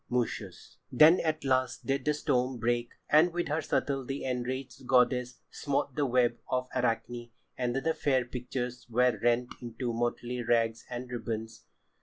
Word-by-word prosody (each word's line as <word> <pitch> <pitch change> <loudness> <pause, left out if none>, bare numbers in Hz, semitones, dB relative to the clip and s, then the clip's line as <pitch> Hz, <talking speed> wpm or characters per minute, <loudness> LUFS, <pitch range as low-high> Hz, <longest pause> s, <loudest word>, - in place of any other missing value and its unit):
Moschus. 125 -1 -3
Then 160 +4 +7
at 155 -1 -1
last 130 -2 0
did 135 -1 -1
the 150 0 +2
storm 130 -4 0
break, 120 0 0 0.2
and 155 +4 +5
with 175 -1 -2
her 155 +2 0
shuttle 140 -2 -1
the 135 +2 -4
enraged 130 0 -4
goddess 125 0 +3
smote 140 -1 -1
the 145 -2 +1
web 120 -1 +2
of 125 0 0
Arachne, 120 -1 -1 0.3
and 125 -1 -1
the 160 +4 +1
fair 130 -5 +1
pictures 125 0 -5
were 125 +1 +2
rent 120 +1 +1
into 120 0 -4
motley 120 +1 -2
rags 115 -1 +1
and 125 0 -5
ribbons. 115 -1 -5
125 Hz, 155 wpm, -30 LUFS, 120-135 Hz, 0.3 s, Then